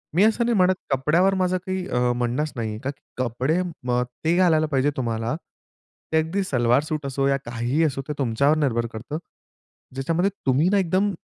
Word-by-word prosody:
मी 190 - +5
असं 225 +2 +3
नाही 235 - +2
म्हणत 185 0 +4 0.2
कपड्यावर 160 +9 +3
माझं 185 0 +2
काही 185 -1 -2
अ, 125 0 +1
म्हणणंच 125 +5 -1
नाही 110 -3 -3
का 140 - -1
की 145 0 -8 0.2
कपडे 130 +6 0
अ, 125 -9 -1 0.2
ते 165 +2 +2
घालायला 160 -4 +4
पाहिजे 140 -1 +1
तुम्हाला 115 0 -1 0.8
ते - - +4
अगदी 165 +5 0
सलवार 125 -3 +2
सूट 155 -2 -4
असो 135 0 0
या 140 0 +2
काहीही 120 +6 0
असो 135 -3 0
ते 150 - -2
तुमच्यावर 140 +4 +2
निर्भर 120 -6 +1
करतं. 120 +7 -5 0.8
ज्याच्यामध्ये 165 +8 +1 0.2
तुम्ही 135 +5 +3
ना 205 - +3
एकदम 190 +2 +1
145 Hz, 180 wpm, -24 LUFS, 125-175 Hz, 0.8 s, मी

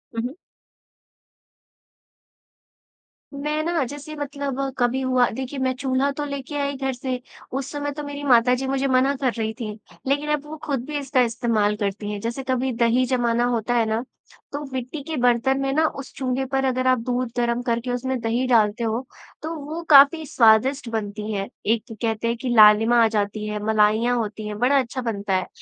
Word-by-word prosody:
उहुँ। 245 +4 -2 3.0
मैं 300 +2 -2
ना 335 -4 0
जैसे 290 +4 -8
मतलब 280 -2 -4 0.2
कभी 250 +2 +1
हुआ 255 -1 +3
देखिए 265 +1 -4
मैं 260 0 +1
चूल्हा 265 +2 0
तो 295 +1 -4
लेके 280 +1 -6
आई 280 0 -1
घर 265 -1 -2
से, 255 -1 -4 0.3
उस 270 +1 -4
समय 290 0 -3
तो 295 +1 -6
मेरी 285 0 -6
माताजी 250 0 +3
मुझे 270 0 0
मना 265 +2 +3
कर 260 -3 0
रही 220 -1 -2
थी। 215 -2 -4 0.4
लेकिन 290 +2 0
अब 295 0 -2
वो 310 +1 -8
ख़ुद 275 -5 -2
भी 295 0 -3
इसका 270 -2 +1
इस्तेमाल 230 -3 +1
करती 205 0 -3
है। 205 - -4
जैसे 235 +5 -4
कभी 260 0 0
दही 240 +2 +3
जमाना 240 -2 +1
होता 240 0 0
है 230 -2 +3
ना, 220 +2 -1 0.5
तो 290 +1 -4
मिट्टी 260 +4 -4
के 315 +2 -4
बर्तन 245 +2 +2
में 270 0 0
ना 315 +2 +3
उस 265 - -8
चूल्हे 265 0 -1
पर 270 0 -1
अगर 255 0 0
आप 255 -2 +4
दूध 250 -1 -1
गरम 240 0 +1
करके 240 0 -1
उसमें 255 +1 -2
दही 235 +3 0
डालते 230 -1 +3
हो, 230 +3 -1 0.4
तो 315 +2 -4
वहाँ 310 +3 -6
काफ़ी 290 +3 +7
स्वादिष्ट 240 +1 +3
बनती 215 -1 -4
है। 195 -1 -2 0.2
एक 225 +1 +1 0.2
कहते 225 0 -1
हैं 235 - 0
कि 255 - -2
लालिमा 220 +2 +7
आ 225 - +5
जाती 210 0 -2
हैं, 210 0 -3
मलाइयाँ 220 +3 +3
होती 215 -1 -4
हैं, 210 0 -5
बड़ा 270 +3 +4
अच्छा 255 +1 -3
बनता 205 -4 -2
है। 185 - -1
255 Hz, 185 wpm, -23 LUFS, 230-275 Hz, 3.0 s, काफ़ी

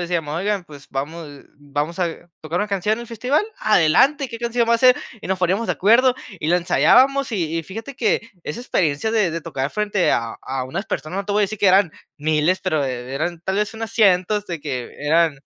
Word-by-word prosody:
decíamos: 160 -4 -2
"Oigan, 200 +1 -1
pues, 145 -4 -14
vamos 150 +4 -5 0.3
vamos 145 +4 -4
a 175 0 -3
tocar 160 +2 -3
una 210 - 0
canción 205 +1 0
en 230 - -8
el 235 - -10
festival. 250 - 0 0.2
Adelante 215 - +4
¿qué 230 -1 -7
canción 235 0 0
va 235 - +5
a - - +1
ser?". 250 +1 +6 0.2
Y - - -8
nos 190 0 0
poníamos 190 +5 0
de - - +3
acuerdo, 245 +6 +4 0.2
y 155 - -2
la 175 - +4
ensayábamos 270 +10 +4
y 165 -6 -1
y 165 - -3
fíjate 225 - -8
que 230 - 0
esa 150 - -5
experiencia 185 - 0
de 210 -6 +2
de 165 +1 -4
tocar 135 -2 -3
frente 210 -3 0
a 115 -1 -1
a 130 -1 -3
unas 130 - -4
personas, 155 +7 -4
no 200 - -3
te 205 - -5
voy 210 +1 +3
a - - +5
decir 210 +2 -5
que 200 - +5
eran 185 -3 +4 0.3
miles, 155 +4 +1
pero, 160 -7 0
eh, 125 0 -5
eran 165 +4 -2
tal 190 - -1
vez 210 +2 0
unas 225 0 -6
cientos, 205 -1 +3
de 170 -2 -4
que, 130 -5 -5
eran 155 0 +2
185 Hz, 225 wpm, -21 LUFS, 155-220 Hz, 0.3 s, ser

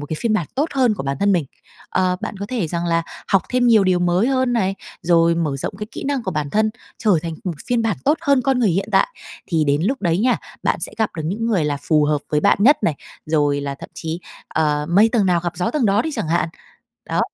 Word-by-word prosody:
một 145 - -6
cái 155 - -4
phiên 230 -2 +1
bản 175 -8 0
tốt 295 +5 0
hơn 250 -5 +3
của 180 - -5
bản 140 0 -2
thân 200 0 +3
mình. 170 -5 +1 0.4
Ờ, 185 -1 +1
bạn 205 - -5
có 200 +1 -5
thể 225 -8 -2
rằng 170 +1 -2
là 165 0 +1 0.3
học 195 -3 +3
thêm 250 -1 +2
nhiều 220 -4 +5
điều 185 -1 +3
mới 175 +4 +2
hơn 260 -2 +1
này, 195 -5 +1 0.3
rồi 170 -1 +4
mở 155 -5 -1
rộng 135 - -4
cái 210 - -4
kỹ - - -6
năng 275 -3 -1
của - - -3
bản 150 -2 -3
thân, 215 +4 +2 0.3
trở 205 -8 +3
thành 165 -1 -4
một 180 - -1
phiên 240 -2 +1
bản 220 -6 0
tốt 300 +4 +3
hơn 280 -5 +2
con 265 0 +1
người 220 -6 +3
hiện 195 +4 -1
tại, - - +4 0.4
thì 160 -4 +1
đến 145 +2 +1
lúc 265 +8 0
đấy 170 -1 +1
nha, 250 +3 +3 0.3
bạn - - 0
sẽ - - -4
gặp 220 - +1
được 160 - -3
những 215 +7 -2
người 195 -9 +1
là 145 -1 0
phù 150 -1 +3
hợp 150 0 +1
với 150 - +2
bạn - - +3
nhất 275 +7 +6
này, 160 -7 +1 0.3
rồi 145 -2 +1
là 140 -1 -4
thậm - - -10
chí, 165 +2 -5 0.3
ờ, 150 -1 0
mây 205 +6 +5
tầng 215 -5 +3
nào 175 -2 +2
gặp 175 0 -4
gió 180 - 0
tầng 290 -7 +1
đó 200 +3 +3
đi 315 - -3
chẳng 160 - -3
hạn, 170 0 +1 0.6
đó. - - 0
185 Hz, 265 wpm, -20 LUFS, 160-225 Hz, 0.6 s, nhất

